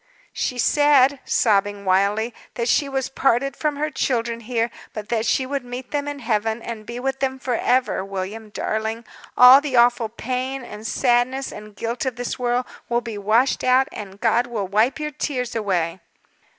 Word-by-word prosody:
"She 250 Hz, -, -2 dB
said" 285 Hz, +1 st, +4 dB
sobbing 205 Hz, -2 st, +1 dB
wildly 200 Hz, +5 st, +2 dB, 0.2 s
"that 235 Hz, -1 st, -2 dB
she 280 Hz, +2 st, +2 dB
was 270 Hz, -1 st, -1 dB
parted 270 Hz, 0 st, +1 dB
from 300 Hz, -2 st, -1 dB
her 305 Hz, +2 st, -2 dB
children 235 Hz, -4 st, -1 dB
here; 235 Hz, 0 st, -1 dB, 0.2 s
but 210 Hz, -1 st, -6 dB, 0.2 s
she 260 Hz, -, +2 dB
should 275 Hz, 0 st, -3 dB
meet 245 Hz, +1 st, -8 dB
them 290 Hz, -1 st, -2 dB
in 290 Hz, 0 st, -4 dB
Heaven, 225 Hz, -3 st, -1 dB
and 225 Hz, -2 st, -7 dB
be 240 Hz, +1 st, -5 dB
with 270 Hz, +1 st, -2 dB
them 265 Hz, -1 st, -1 dB
forever. 255 Hz, -4 st, 0 dB
William, 195 Hz, +3 st, -6 dB
darling! 220 Hz, +2 st, -3 dB, 0.3 s
all 250 Hz, +3 st, +9 dB
the 285 Hz, -3 st, -3 dB
awful 240 Hz, -1 st, +4 dB
pain, 255 Hz, +3 st, -3 dB
and 215 Hz, -1 st, -8 dB
sadness, 255 Hz, +3 st, +1 dB
and 210 Hz, -1 st, -11 dB
guilt 235 Hz, +4 st, -3 dB
of 255 Hz, -, -2 dB
this 245 Hz, +1 st, -4 dB
world 245 Hz, 0 st, 0 dB, 0.2 s
will 240 Hz, 0 st, +1 dB
be 225 Hz, -3 st, -6 dB
washed 225 Hz, +6 st, +2 dB
out, 255 Hz, +1 st, +4 dB
and 200 Hz, -2 st, -9 dB
God 235 Hz, +2 st, +2 dB
will 215 Hz, -5 st, -3 dB
wipe 220 Hz, +8 st, +2 dB
your 300 Hz, 0 st, -3 dB
tears 255 Hz, -4 st, -3 dB
away." 185 Hz, -5 st, -1 dB
240 Hz, 175 wpm, -22 LUFS, 220-265 Hz, 0.3 s, all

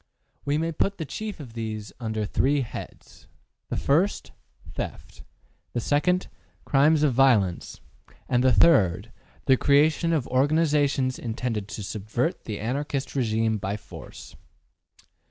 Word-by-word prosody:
We 145 Hz, +1 st, +1 dB
may 165 Hz, +1 st, -1 dB
put 195 Hz, +5 st, -1 dB
the 160 Hz, -, -4 dB
chief 215 Hz, +6 st, -6 dB
of 130 Hz, -6 st, -10 dB
these 110 Hz, -2 st, -5 dB
under 110 Hz, -3 st, -2 dB
three 140 Hz, +7 st, +1 dB
heads: 120 Hz, -, -9 dB, 0.4 s
1. -, -, -2 dB, 0.9 s
Theft. -, -, -7 dB, 0.5 s
2. 150 Hz, +9 st, +2 dB, 0.5 s
Crimes 150 Hz, +2 st, +4 dB
of 145 Hz, -4 st, +3 dB
violence. 115 Hz, -9 st, +2 dB, 0.5 s
3. 125 Hz, -, +1 dB
The 115 Hz, -, +2 dB
creation 155 Hz, +4 st, +3 dB
of 155 Hz, -7 st, 0 dB
organizations 140 Hz, -1 st, +2 dB
intended 115 Hz, -3 st, -3 dB
to 105 Hz, -, -6 dB
subvert 110 Hz, -, -3 dB
the 105 Hz, -2 st, -4 dB
Anarchist 135 Hz, +4 st, -3 dB
regime 110 Hz, -3 st, +1 dB
by 100 Hz, +2 st, -3 dB
force. 105 Hz, -, -12 dB
130 Hz, 115 wpm, -25 LUFS, 110-150 Hz, 0.9 s, Crimes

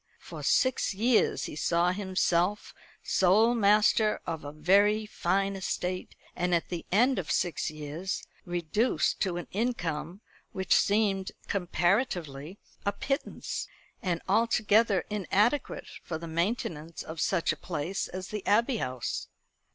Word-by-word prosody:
For -, -, -9 dB
six 255 Hz, -6 st, +2 dB
years 230 Hz, +3 st, +2 dB
he -, -, -5 dB
saw 170 Hz, +3 st, +2 dB
himself 185 Hz, 0 st, 0 dB, 0.3 s
sole 210 Hz, +6 st, +4 dB
master 210 Hz, 0 st, +4 dB
of 160 Hz, -2 st, -4 dB
a 145 Hz, -, -6 dB
very 200 Hz, +8 st, +3 dB
fine 195 Hz, 0 st, 0 dB
estate, 185 Hz, -1 st, -3 dB, 0.2 s
and 180 Hz, 0 st, +1 dB
at 170 Hz, -, -1 dB
the 175 Hz, -2 st, -5 dB
end 245 Hz, +6 st, +4 dB
of 175 Hz, -, -5 dB
six 175 Hz, -, 0 dB
years 155 Hz, +5 st, -5 dB, 0.2 s
reduced 175 Hz, +7 st, 0 dB
to 180 Hz, -3 st, 0 dB
an 175 Hz, -, -4 dB
income 185 Hz, -5 st, -2 dB, 0.3 s
which 190 Hz, 0 st, +1 dB
seemed, 200 Hz, -2 st, +2 dB, 0.2 s
comparatively, 175 Hz, -, -1 dB, 0.3 s
a 200 Hz, -, +1 dB
pittance, 275 Hz, +8 st, -3 dB, 0.3 s
and 175 Hz, -3 st, -2 dB
altogether 215 Hz, -1 st, +3 dB
inadequate 210 Hz, +6 st, 0 dB
for 160 Hz, -, -4 dB
the 165 Hz, +1 st, -8 dB
maintenance 165 Hz, -2 st, -2 dB
of 160 Hz, 0 st, -6 dB
such 170 Hz, -, +1 dB
a -, -, -2 dB
place 170 Hz, +4 st, -3 dB
as 185 Hz, +1 st, -7 dB
the 210 Hz, -2 st, -4 dB
Abbey 230 Hz, +4 st, +3 dB
House. 125 Hz, -, -3 dB
190 Hz, 130 wpm, -29 LUFS, 170-210 Hz, 0.3 s, sole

